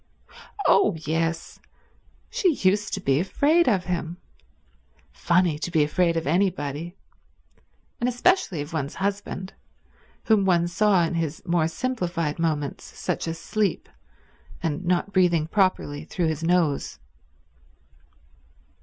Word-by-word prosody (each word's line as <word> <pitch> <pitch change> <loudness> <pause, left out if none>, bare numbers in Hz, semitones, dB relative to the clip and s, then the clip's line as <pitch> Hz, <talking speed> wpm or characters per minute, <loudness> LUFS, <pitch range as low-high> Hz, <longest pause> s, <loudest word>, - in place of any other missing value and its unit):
Oh 210 - +4
yes—she 165 - -3
used 200 +2 +2
to - - -5
be 135 -6 +1
afraid 290 - +3
of 195 -6 +1
him. 175 -1 -3 0.9
Funny 170 -3 +1
to 165 - -3
be 160 -3 +3
afraid 170 +3 +1
of 165 - -2
anybody; 165 -1 -1 1.0
and 245 0 +1
especially 245 - +1
of 145 +3 -8
one's 145 -3 -3
husband, 195 -1 -3 0.7
whom 215 -3 +3
one 175 -3 +2
saw 185 +1 +3
in 165 - -1
his 165 -2 -3
more 170 -2 +2
simplified 175 -7 -2
moments, 150 -4 -1
such - - -2
as 165 0 -3
asleep, 210 +4 -1 0.8
and 160 +1 -2
not 180 +2 0
breathing 175 -4 +3
properly 165 -5 0
through 165 +1 -1
his 160 0 -3
nose. 165 -4 +1
175 Hz, 120 wpm, -25 LUFS, 160-195 Hz, 1.0 s, Oh